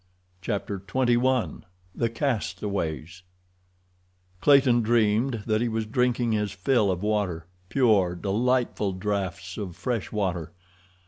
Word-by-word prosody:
Chapter 100 0 -3
XXI 125 +4 +1 0.3
The 115 - 0
Castaways 100 - -3 1.2
Clayton 135 -4 +5
dreamed 115 +1 +2
that 110 -1 +1
he 120 - +1
was 110 -1 -2
drinking 120 +1 +1
his 105 -2 0
fill 105 +2 +2
of 90 0 -2
water, 100 -6 -1 0.2
pure, 105 -9 +3
delightful 105 +1 0
drafts 95 0 -3
of 95 -5 -5
fresh 120 -6 -3
water. 90 -6 -2
105 Hz, 110 wpm, -26 LUFS, 95-120 Hz, 1.2 s, Clayton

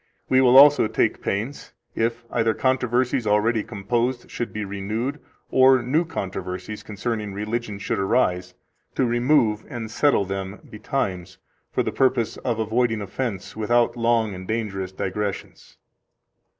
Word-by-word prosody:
We 130 0 +5
will 130 0 +6
also 145 -3 +8
take - - 0
pains, 110 +8 -4 0.2
if 115 +1 -1
either 115 -1 +1
controversies 125 -2 +1
already 105 +2 +2
composed 120 +5 -2
should 120 - -4
be 110 -1 -4
renewed, 110 +8 -3 0.3
or 130 -1 +5
new 150 +8 +1
controversies 95 - -5
concerning 105 -1 -4
religion 105 0 -3
should 100 - -2
arise, 90 -3 0 0.4
to 130 - +2
remove 120 -3 +2
and 115 -2 -6
settle 140 -5 +2
them 95 +1 -5
betimes, 100 -6 -3 0.3
for - - 0
the - - -2
purpose 130 -4 +1
of 120 -3 -2
avoiding 115 +1 0
offense, 100 -2 -4
without 120 +3 +2
long 115 -3 +1
and 95 0 -8
dangerous 100 -4 -3
digressions. 100 +1 -5
110 Hz, 135 wpm, -23 LUFS, 100-125 Hz, 0.4 s, also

